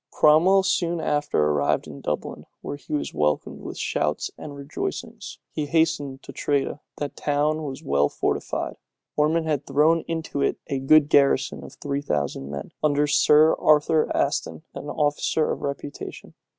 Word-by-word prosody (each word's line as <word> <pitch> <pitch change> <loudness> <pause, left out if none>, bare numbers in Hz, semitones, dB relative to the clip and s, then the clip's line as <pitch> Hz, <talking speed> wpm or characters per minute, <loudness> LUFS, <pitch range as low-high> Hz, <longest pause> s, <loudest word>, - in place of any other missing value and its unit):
Cromwell 175 +6 +5
soon 175 -2 0
after 145 - +1
arrived 75 -1 +1
in 75 -3 -10
Dublin, - - -4
where - - -5
he 145 - -14
was 145 - -3
welcomed 75 0 -1
with - - -7
shouts 75 0 -1
and 145 -2 -9
rejoicings. 145 - -6
He 150 -2 -3
hastened 145 -4 0
to - - -10
Tredah. 140 0 -1 0.2
That 145 -1 -4
town 150 +2 0
was 135 -2 -6
well 70 +1 +2
fortified: - - -2 0.4
Ormond 160 +2 +2
had 150 -3 -1
thrown 160 +3 +3
into 160 -4 -3
it - - +1
a 135 - -2
good 145 +2 +5
garrison 140 -2 +3
of - - -11
three 140 0 -3
thousand 70 - -2
men, 70 0 -6
under 150 -1 +2
Sir 150 +1 +5
Arthur 155 +1 +3
Aston, - - -1
an - - -7
officer 150 +1 0
of - - -4
reputation. 140 0 -6
145 Hz, 155 wpm, -24 LUFS, 140-155 Hz, 0.4 s, Cromwell